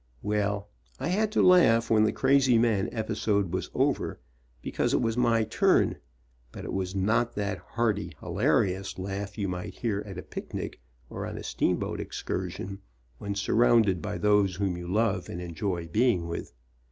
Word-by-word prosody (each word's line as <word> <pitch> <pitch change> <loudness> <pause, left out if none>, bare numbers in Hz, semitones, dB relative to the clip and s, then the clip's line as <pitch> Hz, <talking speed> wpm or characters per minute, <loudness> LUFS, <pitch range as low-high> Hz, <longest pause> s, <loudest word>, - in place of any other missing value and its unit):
Well, 105 -1 -1 0.3
I 155 - -2
had 210 +4 +1
to - - +3
laugh 115 -12 +5
when 110 -1 +5
the 105 - +2
crazy 130 -2 +4
man 115 -4 +2
episode 105 -4 -1
was 95 - -2
over - - 0 0.4
because - - 0
it - - +3
was 115 -1 0
my 115 -2 +3
turn, 110 - +2 0.5
but - - -8
it - - -5
was 95 0 -2
not 110 +5 +1
that 100 -1 -2
hearty, 105 -7 -1
hilarious 95 0 0
laugh 100 +2 -5
you 100 -2 -1
might 90 -1 -5
hear 105 -4 -1
at 95 -3 -7
a 90 - -6
picnic - - -6 0.3
or - - -6
on - - -6
a - - -7
steamboat - - -1
excursion, 95 +1 -4 0.4
when 100 0 -4
surrounded 110 -3 +3
by 85 - -3
those 100 -1 +3
whom 95 -1 -1
you 85 0 -7
love 100 -1 0
and 85 - -5
enjoy 85 0 -3
be 110 +10 +3
ing 85 -2 -3
with. 85 - -5
100 Hz, 170 wpm, -28 LUFS, 95-115 Hz, 0.5 s, laugh